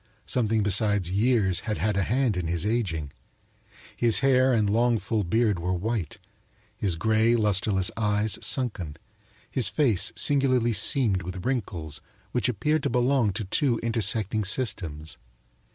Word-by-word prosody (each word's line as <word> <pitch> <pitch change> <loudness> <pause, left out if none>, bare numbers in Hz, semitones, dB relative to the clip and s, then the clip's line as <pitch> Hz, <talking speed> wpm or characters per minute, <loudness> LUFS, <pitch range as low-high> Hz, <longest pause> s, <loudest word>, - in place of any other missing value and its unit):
Something 110 -3 0
besides 100 -2 +2
years 100 -3 +1
had 110 -2 -4
had 105 -1 -1
a 100 - +1
hand 120 +2 0
in 90 -2 -3
his 85 +2 -2
aging. 90 -11 -2 0.8
His 120 0 +3
hair 130 -1 +3
and 110 -4 +1
long, 115 +3 +2
full 110 0 -2
beard 105 +1 0
were 90 +2 -2
white, 105 0 -4 0.6
his 95 -5 -1
gray, 110 +5 +2
lustreless 100 -3 +1
eyes 105 0 0
sunken, 100 - -1 0.5
his 130 - +1
face 120 - +2
singularly 130 -5 +2
seamed 105 -1 +3
with 90 +1 -7
wrinkles 85 - -4 0.3
which 125 -1 0
appeared 150 +8 -1
to - - -2
belong 125 -3 +1
to 110 - -3
two 120 +5 0
intersecting 110 -2 0
systems. 85 - -2
110 Hz, 140 wpm, -25 LUFS, 95-120 Hz, 0.8 s, His